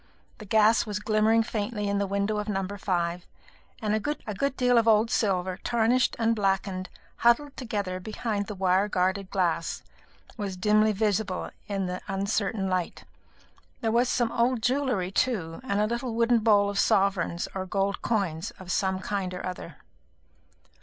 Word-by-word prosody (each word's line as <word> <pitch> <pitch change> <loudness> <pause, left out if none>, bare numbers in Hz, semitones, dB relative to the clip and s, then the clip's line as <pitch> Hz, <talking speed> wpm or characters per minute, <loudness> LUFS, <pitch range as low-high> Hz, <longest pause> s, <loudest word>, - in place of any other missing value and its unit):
The 215 - -9
gas 220 +2 +4
was 210 -1 -2
glimmering 215 +1 +3
faintly 210 -1 -3
in 200 0 0
the 200 - 0
window 200 +2 0
of 210 0 -3
No. 195 -2 -1
5, 175 -4 -2 0.6
and 210 -1 +1
a 215 - +2
good 275 0 -3
deal 250 -2 +4
of 230 - 0
old 220 +1 +4
silver, 185 -3 0
tarnished 240 +1 +2
and 230 -1 +2
blackened, 195 -2 -1 0.3
huddled 255 +5 +3
together 205 -7 -3
behind 210 +1 -3
the 210 - -5
wire 190 +1 +2
guarded 190 0 0
glass, 175 -4 -1 0.5
was 200 -4 -4
dimly 215 +3 +3
visible 205 -2 -1 0.2
in 195 -2 -2
the 180 0 -4
uncertain 195 +1 -1
light. 185 -2 -2 0.8
There 225 - 0
was 240 +2 +2
some 240 -2 +1
old 235 -1 +1
jewellery 250 -8 0
too, 195 -8 -1
and 205 -6 -1
a 210 - +3
little 235 +1 -3
wooden 235 0 +3
bowl 210 -2 +4
of 200 - -2
sovereigns 190 -3 +1
or 190 -1 -4
gold 200 +1 -1
coins 195 -5 -1
of 185 -2 -7
some 190 -1 0
kind 195 -2 -2
or 180 - -5
other. 180 0 -6
205 Hz, 160 wpm, -27 LUFS, 190-225 Hz, 0.8 s, gas